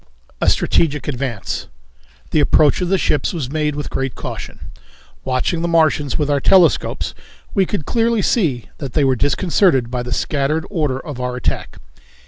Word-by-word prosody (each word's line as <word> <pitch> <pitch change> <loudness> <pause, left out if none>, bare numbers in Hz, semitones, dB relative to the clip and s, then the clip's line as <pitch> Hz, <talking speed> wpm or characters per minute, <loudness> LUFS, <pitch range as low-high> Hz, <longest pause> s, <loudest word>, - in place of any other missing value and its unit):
A - - +4
Strategic 150 -3 +1
Advance. 125 -7 -3 0.6
The 155 - +3
approach 150 +2 +4
of 180 - -1
the 195 - +3
ships 150 -2 0
was 140 -7 -4
made 150 -1 -1
with 145 - -5
great 135 -1 -2
caution. - - -7 0.5
Watching 130 +6 -1
the 170 - 0
Martians 155 -4 +2
with 150 - 0
our 145 -1 +2
telescopes 180 +4 +3 0.4
we 195 -3 +2
could 180 -9 -3
clearly 230 -2 +1
see 145 - +1
that 135 -5 -6
they 150 - +2
were 135 -1 +3
disconcerted 145 - +2
by 125 -1 -2
the 125 0 -6
scattered 145 +5 0
order 150 -8 -1
of 140 -4 -7
our 125 0 -2
attack. 125 - -3
150 Hz, 165 wpm, -19 LUFS, 130-170 Hz, 0.6 s, A